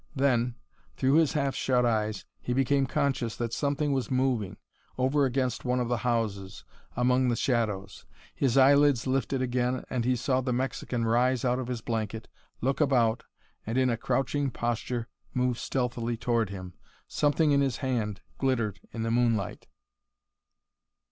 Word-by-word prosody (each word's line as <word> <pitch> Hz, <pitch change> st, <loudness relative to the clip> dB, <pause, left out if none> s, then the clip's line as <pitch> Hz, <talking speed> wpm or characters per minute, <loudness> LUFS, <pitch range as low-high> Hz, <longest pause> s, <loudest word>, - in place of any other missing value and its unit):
Then, 125 Hz, -3 st, +2 dB, 0.4 s
through 130 Hz, +1 st, +2 dB
his 160 Hz, -3 st, +3 dB
half 140 Hz, -3 st, 0 dB
shut 125 Hz, -2 st, +1 dB
eyes, 110 Hz, -2 st, 0 dB
he 125 Hz, -, -3 dB
became 135 Hz, +1 st, +2 dB
conscious 135 Hz, -5 st, -1 dB
that 115 Hz, -1 st, -3 dB
something 145 Hz, +2 st, 0 dB
was 130 Hz, -2 st, -1 dB
moving, 130 Hz, -7 st, 0 dB, 0.4 s
over 135 Hz, +3 st, +2 dB
against 130 Hz, -1 st, -1 dB
one 125 Hz, 0 st, 0 dB
of 120 Hz, -1 st, -1 dB
the 120 Hz, -, +1 dB
houses, 110 Hz, -5 st, -2 dB, 0.3 s
among 125 Hz, +1 st, +2 dB
the 120 Hz, -, +1 dB
shadows. 105 Hz, -6 st, -1 dB, 0.3 s
His 135 Hz, -2 st, +1 dB
eyelids 140 Hz, -1 st, +5 dB
lifted 130 Hz, 0 st, 0 dB
again 125 Hz, 0 st, 0 dB
and 125 Hz, -2 st, 0 dB
he 125 Hz, +2 st, +2 dB
saw 130 Hz, +1 st, 0 dB
the 130 Hz, 0 st, -2 dB
Mexican 125 Hz, -2 st, -2 dB
rise 125 Hz, +2 st, +2 dB
out 125 Hz, +1 st, +1 dB
of 130 Hz, -, -4 dB
his 125 Hz, -3 st, -3 dB
blanket, 110 Hz, -1 st, -3 dB, 0.3 s
look 135 Hz, +4 st, 0 dB
about, 125 Hz, -5 st, +2 dB, 0.4 s
and 115 Hz, +3 st, -3 dB
in 130 Hz, -1 st, +3 dB
a -, -, +1 dB
crouching 135 Hz, +4 st, 0 dB
posture 120 Hz, 0 st, -2 dB, 0.3 s
move 125 Hz, -1 st, +1 dB
stealthily 120 Hz, -2 st, -2 dB
toward 115 Hz, -3 st, 0 dB
him. 95 Hz, -2 st, -7 dB, 0.3 s
Something 150 Hz, +1 st, +2 dB
in 140 Hz, 0 st, +4 dB
his 135 Hz, -3 st, 0 dB
hand 110 Hz, -6 st, -1 dB, 0.2 s
glittered 115 Hz, -6 st, 0 dB
in 115 Hz, -, -4 dB
the 115 Hz, -, -1 dB
moonlight. 115 Hz, -5 st, 0 dB
125 Hz, 155 wpm, -28 LUFS, 115-135 Hz, 0.4 s, eyelids